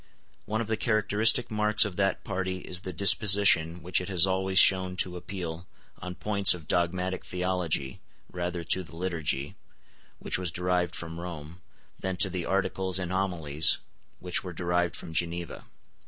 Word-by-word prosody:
One 110 Hz, +1 st, -2 dB
of -, -, -3 dB
the 110 Hz, 0 st, -1 dB
characteristic 110 Hz, +2 st, +2 dB
marks 105 Hz, 0 st, +3 dB
of 100 Hz, -3 st, -5 dB
that 95 Hz, -1 st, 0 dB
party 95 Hz, -1 st, -3 dB
is 90 Hz, 0 st, -4 dB
the 95 Hz, -, -6 dB
disposition 95 Hz, -3 st, +4 dB
which 90 Hz, +1 st, 0 dB
it 90 Hz, -, -7 dB
has 95 Hz, -2 st, +4 dB
always 95 Hz, 0 st, -1 dB
shown 95 Hz, -1 st, +6 dB
to 90 Hz, -1 st, -1 dB
appeal, 85 Hz, -1 st, -7 dB, 0.3 s
on 90 Hz, 0 st, -7 dB
points 100 Hz, -2 st, +4 dB
of 80 Hz, -3 st, -13 dB
dogmatic 90 Hz, +1 st, -1 dB
theology, 90 Hz, -7 st, -3 dB, 0.3 s
rather 90 Hz, -1 st, -4 dB
to 95 Hz, +3 st, +1 dB
the 80 Hz, -2 st, -11 dB
Liturgy, 80 Hz, -6 st, -3 dB, 0.6 s
which -, -, -1 dB
was 90 Hz, -1 st, -2 dB
derived 90 Hz, +1 st, -1 dB
from 85 Hz, 0 st, -7 dB
Rome, 85 Hz, 0 st, -9 dB, 0.4 s
than 95 Hz, -1 st, -3 dB
to 95 Hz, 0 st, 0 dB
the 90 Hz, -1 st, -4 dB
Articles 95 Hz, -1 st, -1 dB
and 90 Hz, -2 st, -3 dB
Homilies, 85 Hz, -6 st, +3 dB, 0.4 s
which 90 Hz, -1 st, -2 dB
were 90 Hz, -2 st, -7 dB
derived 85 Hz, 0 st, -1 dB
from 80 Hz, -, -9 dB
Geneva. 85 Hz, 0 st, -3 dB
90 Hz, 160 wpm, -27 LUFS, 85-95 Hz, 0.6 s, shown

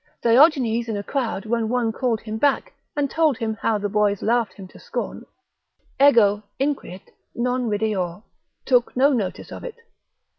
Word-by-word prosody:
Diogenes 240 Hz, -2 st, +4 dB
in 215 Hz, -, -2 dB
a 200 Hz, -, -4 dB
crowd 230 Hz, -4 st, -3 dB
when 225 Hz, 0 st, -1 dB
one 240 Hz, -2 st, +1 dB
called 230 Hz, -2 st, -1 dB
him 220 Hz, 0 st, -5 dB
back, 285 Hz, +2 st, +1 dB, 0.2 s
and 290 Hz, -1 st, +1 dB
told 310 Hz, -3 st, +1 dB
him 225 Hz, -2 st, -2 dB
how 220 Hz, -, +1 dB
the 205 Hz, 0 st, -2 dB
boys 205 Hz, -1 st, +1 dB
laughed 230 Hz, -3 st, +1 dB
him 195 Hz, -2 st, -10 dB
to -, -, -15 dB
scorn, -, -, -5 dB, 0.8 s
Ego, 210 Hz, -7 st, +5 dB, 0.2 s
inquit, 265 Hz, -9 st, -3 dB, 0.2 s
non 250 Hz, 0 st, -1 dB
rideor, 205 Hz, -3 st, -2 dB, 0.4 s
took 245 Hz, -1 st, +2 dB
no 275 Hz, +3 st, +4 dB
notice 200 Hz, -7 st, -3 dB
of -, -, -8 dB
it. -, -, -7 dB
230 Hz, 160 wpm, -23 LUFS, 210-255 Hz, 0.8 s, Ego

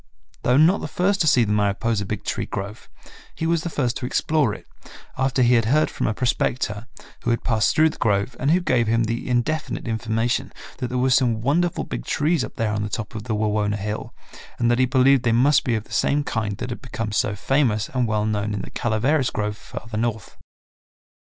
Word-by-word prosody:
Though 125 Hz, +1 st, +3 dB
not 165 Hz, +6 st, +5 dB
the -, -, -4 dB
first 195 Hz, +2 st, 0 dB
to 160 Hz, -, +2 dB
see 130 Hz, -5 st, +5 dB
the 105 Hz, -1 st, 0 dB
Mariposa 105 Hz, +1 st, 0 dB
Big 105 Hz, -1 st, -4 dB
Tree -, -, -3 dB
grove, 100 Hz, +3 st, -6 dB, 0.5 s
he 160 Hz, -, -3 dB
was 165 Hz, -1 st, +1 dB
the 170 Hz, -, -4 dB
first 130 Hz, -6 st, -1 dB
to 125 Hz, -, -4 dB
explore 150 Hz, -3 st, +1 dB
it, -, -, -9 dB, 0.5 s
after 135 Hz, -1 st, +1 dB
he 120 Hz, +1 st, +4 dB
had 115 Hz, -2 st, +3 dB
heard 150 Hz, +7 st, +2 dB
from -, -, -2 dB
a 110 Hz, -, 0 dB
prospector, 120 Hz, -3 st, -1 dB, 0.3 s
who -, -, -2 dB
had 115 Hz, -, 0 dB
passed 110 Hz, -2 st, +1 dB
through 155 Hz, 0 st, +4 dB
the -, -, -14 dB
grove 100 Hz, +1 st, +1 dB
and 135 Hz, -, 0 dB
who 175 Hz, +4 st, +4 dB
gave 120 Hz, -9 st, +1 dB
him 115 Hz, +1 st, +2 dB
the 115 Hz, +3 st, -3 dB
indefinite 125 Hz, +4 st, -1 dB
information, 115 Hz, +3 st, -1 dB, 0.3 s
that 125 Hz, -, -2 dB
there 125 Hz, -, -3 dB
were 130 Hz, +1 st, +2 dB
some 125 Hz, -3 st, +3 dB
wonderful 165 Hz, +7 st, +1 dB
big -, -, -5 dB
trees 150 Hz, -1 st, +1 dB
up -, -, -7 dB
there 110 Hz, -2 st, -1 dB
on 105 Hz, -, -1 dB
the 105 Hz, -, -3 dB
top 110 Hz, +2 st, -5 dB
of 110 Hz, -1 st, -6 dB
the 110 Hz, -2 st, -1 dB
Wawona 105 Hz, -1 st, 0 dB
hill 105 Hz, +1 st, -4 dB, 0.5 s
and 120 Hz, 0 st, +2 dB
that 120 Hz, -, +1 dB
he 130 Hz, -, +5 dB
believed 130 Hz, +1 st, +4 dB
they 120 Hz, -1 st, +1 dB
must 140 Hz, +5 st, +4 dB
be 120 Hz, -6 st, 0 dB
of 110 Hz, -, -2 dB
the -, -, -22 dB
same 145 Hz, +1 st, +2 dB
kind 110 Hz, -6 st, -2 dB
that 125 Hz, +1 st, -5 dB
had 120 Hz, -, -6 dB
become 115 Hz, -5 st, -4 dB
so 105 Hz, 0 st, 0 dB
famous 115 Hz, -1 st, +1 dB
and 125 Hz, -2 st, 0 dB
well 105 Hz, -1 st, 0 dB
known 105 Hz, -1 st, -1 dB
in 105 Hz, -, -3 dB
the -, -, -9 dB
Calaveras 125 Hz, +5 st, +1 dB
grove 105 Hz, 0 st, -2 dB
farther 110 Hz, +1 st, -7 dB
north. 110 Hz, -2 st, -3 dB
120 Hz, 225 wpm, -23 LUFS, 110-135 Hz, 0.5 s, not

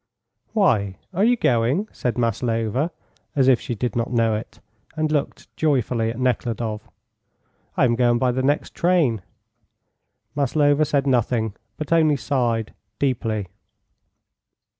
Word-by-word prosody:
"Why? 105 Hz, -, +2 dB, 0.2 s
Are 190 Hz, +3 st, +1 dB
you 240 Hz, +2 st, +4 dB
going?" 130 Hz, -, +1 dB
said 125 Hz, -2 st, -3 dB
Maslova, 115 Hz, +3 st, 0 dB, 0.5 s
as 135 Hz, -2 st, +3 dB
if 130 Hz, -3 st, +4 dB
she 120 Hz, -, -4 dB
did 120 Hz, 0 st, -3 dB
not 120 Hz, 0 st, -1 dB
know 115 Hz, -2 st, +2 dB
it, 105 Hz, 0 st, -6 dB, 0.4 s
and 155 Hz, -1 st, 0 dB
looked 145 Hz, -2 st, -3 dB
joyfully 125 Hz, -6 st, +1 dB
at 115 Hz, +2 st, -5 dB
Nekhludoff. 115 Hz, -3 st, -2 dB, 0.9 s
"I -, -, +4 dB
am 120 Hz, -, +2 dB
going 120 Hz, 0 st, +3 dB
by 125 Hz, +1 st, +2 dB
the 130 Hz, +2 st, -1 dB
next 145 Hz, +3 st, 0 dB
train." 165 Hz, -, +2 dB, 1.1 s
Maslova 145 Hz, +1 st, +2 dB
said 140 Hz, -1 st, 0 dB
nothing, 120 Hz, -4 st, +1 dB, 0.2 s
but 155 Hz, +2 st, -2 dB
only 155 Hz, -3 st, +4 dB
sighed 120 Hz, -6 st, -1 dB, 0.2 s
deeply. 115 Hz, -6 st, -1 dB
125 Hz, 130 wpm, -22 LUFS, 115-145 Hz, 1.1 s, you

